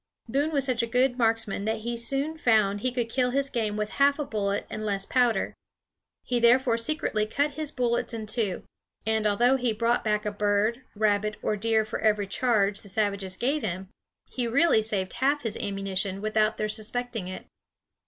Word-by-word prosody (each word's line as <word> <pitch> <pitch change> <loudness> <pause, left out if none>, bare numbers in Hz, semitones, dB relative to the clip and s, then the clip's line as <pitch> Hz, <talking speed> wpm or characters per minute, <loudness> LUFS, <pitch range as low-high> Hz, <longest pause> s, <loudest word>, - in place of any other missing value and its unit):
Boone 280 +7 0
was 280 -3 0
such 255 -3 +1
a 235 - -2
good 250 +2 +2
marksman 225 -3 0
that 220 0 -1
he 235 +2 -3
soon 275 +6 -1
found 215 -8 +2
he 255 - 0
could 240 -2 -1
kill 250 +2 +1
his 275 +2 0
game 215 -3 -1
with 210 0 -2
half 280 0 +5
a 295 - -2
bullet 200 -4 -1
and 215 - -6
less 200 -2 +1
powder. 240 -5 +1 0.7
He 245 -1 0
therefore 235 0 +4
secretly 230 -5 -1
cut 285 +6 0
his 310 0 -4
bullets 245 -5 0
in 225 -2 -5
two, 215 -3 -2 0.4
and 220 -1 +1
although 240 +6 +3
he 245 -3 0
brought 230 +2 +1
back 210 0 0
a 210 - -1
bird, 205 +3 +1
rabbit, 210 0 +1
or 215 - +1
deer 220 +1 +1
for - - -4
every 210 -2 +2
charge 205 -2 +1
the 200 - -12
savages 200 -2 -1
gave 280 +5 0
him, 185 +2 -4 0.4
he 245 -2 -3
really 270 0 +4
saved 200 -4 -2
half 285 +2 +1
his 225 -3 -1
ammunition 195 -1 -2
without 215 +1 +1
their 215 - -1
suspecting 225 -1 -4
it. 185 - -7
220 Hz, 190 wpm, -27 LUFS, 210-250 Hz, 0.7 s, half